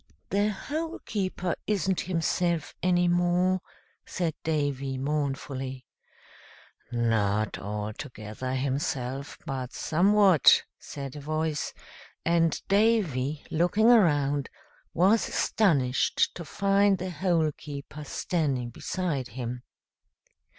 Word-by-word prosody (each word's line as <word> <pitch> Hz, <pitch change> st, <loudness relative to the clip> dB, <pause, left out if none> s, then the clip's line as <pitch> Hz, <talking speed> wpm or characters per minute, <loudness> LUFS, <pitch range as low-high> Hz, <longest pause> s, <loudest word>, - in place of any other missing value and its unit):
"The 205 Hz, +2 st, +2 dB
Hole 315 Hz, -, -4 dB
keeper 185 Hz, -3 st, -2 dB
isn't 195 Hz, -3 st, +1 dB
himself 170 Hz, -2 st, -1 dB
any 175 Hz, 0 st, +3 dB
more," 175 Hz, +1 st, +2 dB, 0.4 s
said 170 Hz, -4 st, -2 dB
Davy, 140 Hz, -4 st, -1 dB
mournfully. 135 Hz, -2 st, -3 dB, 1.1 s
"Not 110 Hz, -3 st, +1 dB
altogether 105 Hz, +4 st, -5 dB
himself, 135 Hz, 0 st, -2 dB
but 130 Hz, -4 st, -4 dB
somewhat," 190 Hz, -1 st, +5 dB, 0.2 s
said 140 Hz, -1 st, -7 dB
a -, -, -6 dB
voice; 155 Hz, +1 st, -2 dB, 0.5 s
and 165 Hz, -1 st, +2 dB
Davy, 185 Hz, -, +2 dB
looking 190 Hz, +8 st, +4 dB
around, 145 Hz, -, +3 dB, 0.5 s
was 195 Hz, +6 st, +4 dB
astonished 140 Hz, -, +2 dB
to 170 Hz, -, -7 dB
find 200 Hz, +4 st, +2 dB
the 185 Hz, +1 st, -4 dB
Hole 165 Hz, -2 st, +1 dB
keeper 145 Hz, +1 st, -8 dB
standing 140 Hz, -5 st, -1 dB
beside 150 Hz, -2 st, -3 dB
him. 125 Hz, 0 st, -5 dB
155 Hz, 95 wpm, -27 LUFS, 135-185 Hz, 1.1 s, somewhat